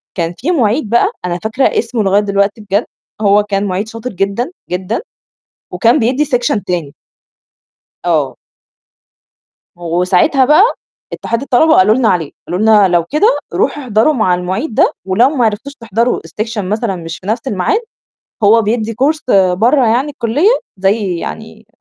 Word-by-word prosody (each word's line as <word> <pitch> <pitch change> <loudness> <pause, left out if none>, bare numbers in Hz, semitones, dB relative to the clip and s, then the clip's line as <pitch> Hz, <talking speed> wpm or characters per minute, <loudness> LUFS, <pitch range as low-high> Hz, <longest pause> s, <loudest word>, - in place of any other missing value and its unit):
كان 170 -2 -2
في 295 +9 -1
مُعيد 240 - 0
بقى 235 +2 +2
أنا 175 0 -2
فاكرة 225 +5 -1 0.2
اسمه 230 -1 -2
لغاية 200 +1 +3
دلوقتي 200 +1 0
بجد، 205 +2 -1 0.4
هو 205 0 +4
كان 200 -1 -2
مُعيد 195 +2 -2
شاطر 230 +2 -6
جدًا، 200 - -2 0.2
جدًا 185 +5 -3 0.7
وكان 235 +1 +3
بيدّي 255 +6 +1
سيكشن 245 -7 -1
تاني. 170 -6 -3 1.1
آه. 155 -6 0 1.4
و 175 0 -2
وساعتها 190 - +3
بقى 300 +7 +5 0.5
اتحاد 230 +2 -3
الطلبة 280 +4 +3
قالوا 210 +3 +5
لنا 240 -2 +2
عليه، 165 -7 0 0.2
قالوا 180 - -2
لنا: 215 -2 +5
"لو 175 -2 +2
كده 360 - +1 0.2
روحوا 295 - 0
احضروا 230 +3 +2
مع 215 -10 +1
المُعيد 185 - -3
ده - - +3
ولو 195 +7 +3
ما 275 -4 0
عرفتوش 220 +6 -2
تحضروا 230 -1 -1
السيكشن 210 +3 -4
مثلًا 215 -1 -2
مش 165 -1 -7
في 185 - -15
نَفْس 225 +5 -2
المعاد، 205 - 0 0.6
هو 220 +3 +5
بيدّي 225 +1 -1
كورس 280 +7 +1 0.3
برّه 240 +7 +2
يعني 245 +6 +1
الكُلّية 290 - +1 0.2
زي 195 -1 0
يعني 75 - -8
215 Hz, 155 wpm, -14 LUFS, 190-245 Hz, 1.4 s, بقى